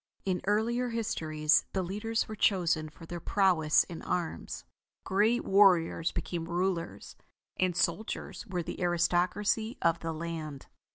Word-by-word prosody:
In 185 -2 +1
the - - -12
earlier 235 +4 +1
histories, 160 -10 +1
the 190 - 0
leaders 210 +5 -2
were 215 - -6
chosen 175 -6 +1
for 165 - -13
their 175 +1 -6
prowess 170 -5 +3
in 170 -3 -9
arms. 175 -3 -3 0.4
Great 215 +5 +2
warriors 180 -4 +4
became 170 -1 -4
rulers, 175 0 -2 0.4
and 185 -2 +1
soldiers 190 +6 -2
were 180 -3 -2
the - - -6
aristocracy 180 +6 +1
of 165 0 +2
the 165 - -3
land. 155 -3 -5
180 Hz, 135 wpm, -30 LUFS, 165-205 Hz, 0.4 s, warriors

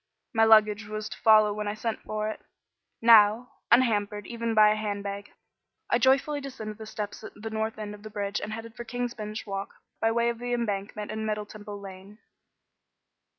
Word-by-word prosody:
My 225 -1 +5
luggage 215 -1 +5
was 215 0 -5
to - - -8
follow 215 -1 +6
when 210 0 -4
I 205 - -2
sent 225 +1 -3
for 215 0 -3
it. 215 - -5 0.6
Now, 225 +1 +6 0.2
unhampered 210 -4 +3
even 230 -1 -3
by 215 -1 +7
a - - +2
hand 205 -2 -3
bag, 200 0 -6 0.6
I 240 - +4
joyfully 275 +3 +3
descended 220 -6 -7
the 220 - -8
steps 210 -2 -6
at - - -9
the 220 +2 -7
north 220 0 -2
end 210 -1 -5
of 205 - -12
the 215 - -9
bridge 205 -1 -3
and 215 - -5
headed 225 +1 -7
for 240 - -6
King's 245 0 -3
Bench 215 -1 -6
Walk 195 -1 -5 0.2
by 225 - +2
way 235 +1 +2
of 235 -1 -4
the 245 0 -3
Embankment 210 -3 -3
and 220 0 -4
Middle 210 -1 -2
Temple 205 -1 -9
Lane. 195 +1 -11
215 Hz, 195 wpm, -27 LUFS, 205-230 Hz, 0.6 s, by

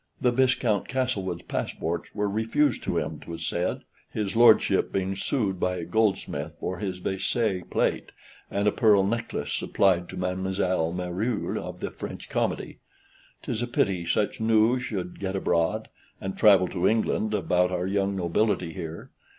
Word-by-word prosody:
(The 125 - +3
Viscount 120 -5 +2
Castlewood's 105 -10 -2
passports) 85 +2 -3
were 105 -1 0
refused 115 +7 +1
to - - 0
him, - - -2
'twas 85 -1 -6
said; 90 +2 -1 0.3
his 105 -1 -3
lordship 115 -2 +5
being 95 0 -1
sued 100 -3 -1
by 90 0 0
a 85 -2 -4
goldsmith 90 -6 0
for 90 -1 -3
Vaisselle 95 +2 -1
plate, - - 0 0.4
and 100 +1 0
a - - +5
pearl 105 -3 +4
necklace 115 +3 -2
supplied 90 -3 +2
to - - -7
Mademoiselle 90 -2 0
Meruel 90 +6 -2
of - - -7
the - - -3
French - - -8
Comedy. - - -2 0.6
'Tis 110 - -3
a 120 - -1
pity 95 -7 +1
such 105 +4 0
news 110 +3 +3
should 95 -7 -4
get 95 -1 -3
abroad 85 -3 0 0.3
(and 95 0 -4
travel 100 -4 +6
to 90 0 +1
England) 110 -1 +1
about 90 -2 +2
our 90 0 -1
young 100 0 0
nobility 90 -1 0
here. 80 -2 -7
95 Hz, 150 wpm, -26 LUFS, 90-110 Hz, 0.6 s, travel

